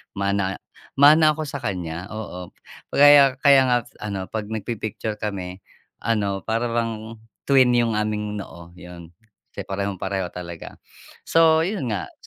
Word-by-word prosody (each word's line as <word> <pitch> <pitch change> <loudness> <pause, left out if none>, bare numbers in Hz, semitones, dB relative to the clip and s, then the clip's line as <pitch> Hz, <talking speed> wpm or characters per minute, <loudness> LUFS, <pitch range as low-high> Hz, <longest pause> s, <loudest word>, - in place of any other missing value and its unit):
mana 100 -1 -1 0.4
mana 155 +2 +7
ako 155 - -4
sa 140 - -5
kaniya, 90 -4 -4
oo. 95 -5 -7 0.4
Kaya 140 -2 +7
kaya 140 -1 +6
nga 125 - +4 0.3
ano, 100 -3 -4
'pag 110 -2 -4
nagpi-picture 110 0 -4
kami, 95 -3 -5 0.4
ano, 100 -4 -1
para 115 +2 -1
bang 115 -1 -3 0.3
twin 130 -3 +5
'yung 120 -2 +2
aming 105 -1 -2
noo, 85 -3 -10
'yun. 90 -2 -11 0.4
Kasi - - -7
parehong-pareho 95 -1 -3
talaga. 85 -2 -9 0.5
So, 160 -1 +4
'yun 185 - -3
nga. 100 -3 -4
105 Hz, 130 wpm, -22 LUFS, 95-120 Hz, 0.5 s, mana